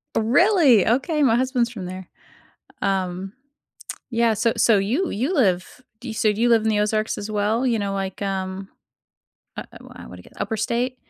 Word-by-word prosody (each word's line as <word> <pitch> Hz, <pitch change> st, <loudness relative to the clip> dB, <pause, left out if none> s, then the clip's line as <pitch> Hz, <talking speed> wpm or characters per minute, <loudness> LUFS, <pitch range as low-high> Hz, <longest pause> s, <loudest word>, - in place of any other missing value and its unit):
Really? 265 Hz, -, +4 dB
Okay, 275 Hz, +7 st, +1 dB
my 230 Hz, -4 st, +4 dB
husband's 250 Hz, -1 st, 0 dB
from 205 Hz, -6 st, -8 dB
there. 185 Hz, 0 st, -8 dB, 0.8 s
Um, 190 Hz, -1 st, -2 dB, 0.8 s
yeah, 230 Hz, -2 st, +2 dB
so 220 Hz, +2 st, 0 dB
so 225 Hz, -3 st, +4 dB
you 245 Hz, -, 0 dB
you 255 Hz, -, -2 dB
live 195 Hz, -, 0 dB, 0.2 s
do 250 Hz, -, -10 dB
you 225 Hz, -, -5 dB
so 220 Hz, -1 st, +1 dB
do 210 Hz, +2 st, -4 dB
you 240 Hz, -, +3 dB
live 230 Hz, -2 st, +4 dB
in 220 Hz, -, +1 dB
the 210 Hz, -1 st, +1 dB
Ozarks 215 Hz, +1 st, -1 dB
as 210 Hz, +1 st, -6 dB
well? 215 Hz, +4 st, 0 dB
You 235 Hz, -4 st, +1 dB
know, 200 Hz, -1 st, -2 dB
like, 195 Hz, 0 st, -5 dB
um, 190 Hz, -1 st, -4 dB, 0.9 s
uh -, -, -4 dB
uh, -, -, -12 dB
why -, -, -14 dB
I -, -, -10 dB
woulda 90 Hz, 0 st, -12 dB
get -, -, -19 dB
li -, -, -16 dB
upper 220 Hz, -, -2 dB
state? 240 Hz, +4 st, -1 dB
220 Hz, 200 wpm, -22 LUFS, 195-245 Hz, 0.9 s, Really